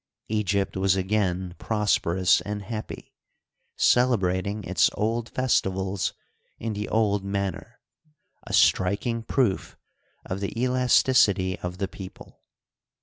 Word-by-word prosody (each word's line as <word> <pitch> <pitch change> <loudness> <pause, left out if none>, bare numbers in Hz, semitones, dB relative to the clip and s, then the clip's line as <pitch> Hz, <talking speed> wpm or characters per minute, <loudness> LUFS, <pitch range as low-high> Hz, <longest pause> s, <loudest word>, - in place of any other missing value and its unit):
Egypt 100 -2 0
was 95 0 +2
again 95 -2 -1
prosperous 95 -5 +2
and 105 +3 -5
happy, 110 +2 -7 0.6
celebrating 100 -4 +2
its - - +3
old 115 +2 -1
festi 130 -6 +1
vals 95 +1 -2 0.4
in 115 -1 -4
the 105 0 -4
old 105 -3 +1
manner 100 -1 -4 0.3
— 150 - -31
a - - -6
striking 105 +5 +2
proof 115 -4 -1 0.5
of 95 - -4
the 100 +3 -4
elasticity 125 -7 +3
of 90 0 -5
the 95 0 -2
people. 95 -1 -11
100 Hz, 115 wpm, -25 LUFS, 95-110 Hz, 0.6 s, its